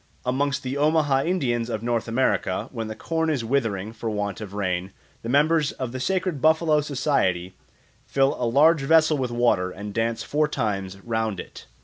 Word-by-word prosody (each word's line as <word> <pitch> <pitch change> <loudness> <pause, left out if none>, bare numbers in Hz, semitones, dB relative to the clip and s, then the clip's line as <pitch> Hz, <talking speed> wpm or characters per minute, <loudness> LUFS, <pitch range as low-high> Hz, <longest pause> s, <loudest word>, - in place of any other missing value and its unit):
Amongst 140 +2 0
the 130 +2 -3
Omaha 145 -2 +2
Indians 125 -10 0
of 110 -2 -3
North 120 -1 -1
America, 115 -6 0
when 115 -3 -4
the 110 - -6
corn 160 +7 -1
is 135 -7 -1
withering 110 -5 -1
for 115 0 -4
want 105 -2 -3
of 100 -2 -7
rain, 95 -1 -2 0.3
the 115 - -6
members 150 +3 +3
of 130 -3 -5
the 130 - -5
sacred 185 -1 -1
Buffalo 160 -1 +3
Society 125 - 0 0.5
fill 135 0 +2
a 120 - +1
large 150 +5 +5
vessel 160 +2 +4
with 130 -2 -1
water 120 -6 +1
and 100 +2 -7
dance 115 +1 -1
four 150 +1 +1
times 100 -8 -3
round 110 -3 -2
it. - - -10
120 Hz, 180 wpm, -24 LUFS, 110-145 Hz, 0.5 s, large